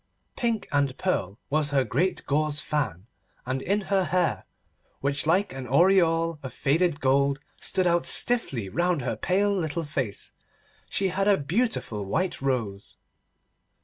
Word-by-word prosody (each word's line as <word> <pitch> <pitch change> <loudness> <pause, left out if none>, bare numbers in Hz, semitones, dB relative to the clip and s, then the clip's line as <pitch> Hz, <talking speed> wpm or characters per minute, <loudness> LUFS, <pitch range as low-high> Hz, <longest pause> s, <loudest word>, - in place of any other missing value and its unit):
Pink 230 -4 -1
and 140 -2 +1
pearl 100 - -1
was 150 0 +1
her 140 -2 +2
great 175 +10 -1
gauze 150 +1 0
fan, 145 - -2 0.4
and 130 +1 -2
in 200 +6 0
her 195 -1 +1
hair, 170 - 0 0.5
which 140 +2 0
like 185 +3 +2
an 130 -1 -6
aureole 165 +1 +3
of 130 - -7
faded 160 +2 +1
gold 140 +1 +2 0.2
stood 185 -1 +1
out 175 -1 +2
stiffly 140 - +2
round 175 - 0
her 125 - -2
pale 200 +3 +1
little 165 -2 -2
face, 135 -9 -4 0.6
she 195 -1 +1
had 195 +2 0
a 200 -2 +5
beautiful 155 - -1
white 175 - -2
rose. 115 -7 -3
155 Hz, 145 wpm, -26 LUFS, 135-185 Hz, 0.6 s, a